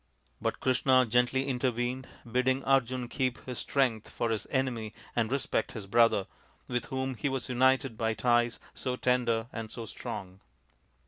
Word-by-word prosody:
But - - -1
Krishna 130 0 +4
gently 125 +3 +2
intervened, 125 0 -1 0.2
bidding 130 +3 +1
Arjun 130 -2 +2
keep 130 -1 -1
his 125 -1 -4
strength 125 -6 0
for 115 -1 -1
his 110 - -2
enemy 120 -5 -1 0.2
and 115 -1 +1
respect 140 0 0
his 110 -4 -6
brother, 115 -1 +4 0.4
with 125 -1 -1
whom 130 0 -2
he 135 +4 -2
was 130 -2 -2
united 130 -1 +2
by 110 -1 +1
ties 120 +1 +2
so 125 -1 -2
tender 120 -3 +1
and 110 -1 -5
so 115 -1 -6
strong. 95 -2 -7
125 Hz, 150 wpm, -30 LUFS, 115-130 Hz, 0.4 s, Krishna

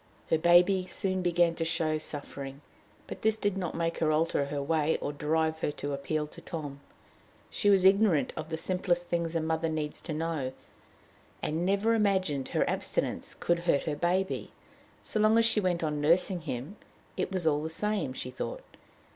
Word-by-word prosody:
Her 160 - +5
baby 180 +2 +5
soon 185 0 -1
began 175 -1 +3
to 165 - -2
show 160 -1 0
suffering, 140 -2 -7 0.4
but - - -8
this 220 0 +3
did 205 -2 0
not 185 -3 -3
make 165 0 -1
her 155 -1 +2
alter 155 -2 +1
her 145 +1 -3
way, 155 +2 +1
or 145 - -3
drive 160 +2 0
her 150 - -1
to 145 0 -4
appeal 150 +2 -2
to 150 - -13
Tom. 145 -5 -6 0.7
She 205 - +1
was 195 -2 +5
ignorant 190 -8 +4
of 155 0 -6
the 160 - -2
simplest 175 0 0
things 170 -1 -1
a - - +3
mother 160 +1 0
needs 155 -1 -2
to 165 - -5
know, 155 -5 -2 0.9
and 165 +4 -1
never 200 +4 +2
imagined 190 -10 +1
her - - +1
abstinence - - -2
could 170 0 0
hurt 170 -5 +1
her 155 - -2
baby. 180 +5 -1 0.5
So 215 - -2
long 215 +1 +5
as 230 - +5
she 225 - +3
went 180 -4 0
on 150 -2 -1
nursing 175 +3 +3
him, 140 - -5 0.4
it - - -2
was 185 -3 -1
all 150 -2 +3
the 160 - -3
same, 200 -4 -1
she 125 -1 -6
thought. - - -5
165 Hz, 185 wpm, -29 LUFS, 150-185 Hz, 0.9 s, Her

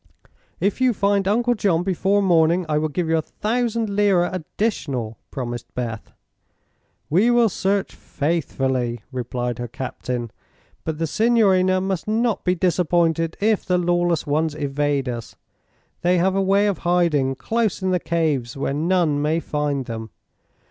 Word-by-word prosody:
"If 200 +7 0
you 255 -1 +4
find 200 -1 +1
Uncle 240 +4 +2
John 185 -7 +1
before 195 +2 +1
morning 170 -1 +3
I 150 -1 +1
will 155 0 -1
give 165 +3 -2
you 160 0 +2
a - - 0
thousand 230 +5 -1
lira 200 -3 +2
additional," 150 - -3
promised 120 -3 -5
Beth. 115 -3 -4 1.0
"We 190 +10 +3
will 240 -2 +4
search 195 +1 -1
faithfully," 130 -6 -2
replied 125 -1 -3
her 120 - -3
captain, 125 -1 -5 0.5
"but 160 -1 -3
the 165 - -1
signorina 190 -2 +3
must 190 -1 -2
not 225 +1 0
be 180 0 +2
disappointed 170 -2 +1
if 215 0 +2
the 180 -1 +1
lawless 175 -1 +1
ones 155 +1 0
evade 145 -1 -1
us. 120 -2 -5 0.7
They 180 +1 +3
have 185 +2 +2
a 195 - +2
way 195 +2 +3
of 205 -3 0
hiding 170 -7 +1
close 220 - -1
in 185 - +1
the 180 - +2
caves, 150 -8 -1
where 135 0 -1
none 160 -1 +1
may 155 +2 +1
find 145 -4 -2
them. 110 -1 -6
170 Hz, 150 wpm, -22 LUFS, 140-195 Hz, 1.0 s, you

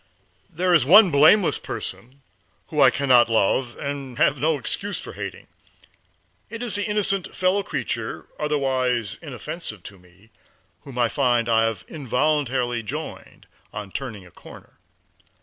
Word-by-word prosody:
There 180 +2 0
is 160 -6 +5
one 190 - +7
blameless 155 +7 +5
person 135 +3 -7 0.5
whom - - 0
I - - +8
can 140 - -3
not 120 -2 +6
love 115 +3 +1
and 140 -3 -5
have 145 - +2
no 155 +2 +1
excuse 200 +8 -3
for - - -8
hating. - - -7 1.0
It 230 +1 -6
is 240 - -2
the 205 0 0
innocent 200 -3 -1
fellow 185 +2 +2
creature, 195 - -4
otherwise 130 -7 -1
inoffensive - - -8
to 100 -2 -12
me, 90 +5 -23 0.5
whom 135 -3 -10
I 120 -1 +3
find 120 -2 +1
I 115 -1 +3
have 115 -2 -3
involuntarily 130 -3 -1
joined 105 - -8 0.3
on 105 -2 -7
turning 110 -7 -6
a 90 - -17
corner. - - -15
135 Hz, 145 wpm, -23 LUFS, 115-160 Hz, 1.0 s, I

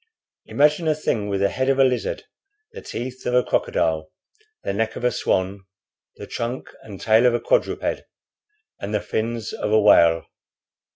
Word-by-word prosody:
Imagine 150 +3 +2
a 155 - +3
thing 110 -8 -2
with 100 -1 -1
the 100 - +3
head 130 +5 -1
of 135 - +2
a 135 - +6
lizard, 125 -2 0 0.5
the 465 - -9
teeth 125 +2 -6
of 125 - +1
a 125 - +4
crocodile, 80 -1 0 0.5
the - - -2
neck 110 +2 -1
of - - -7
a 125 - +3
swan, 95 -2 -1 0.5
the - - -9
trunk 120 +2 -5
and 100 -3 -10
tail 110 +3 +4
of 120 - +3
a - - 0
quadruped, - - 0 0.8
and 105 +2 -4
the - - +2
fins 115 +1 -3
of 105 - -3
a 110 - +5
whale. 85 -5 +5
115 Hz, 175 wpm, -22 LUFS, 100-130 Hz, 0.8 s, a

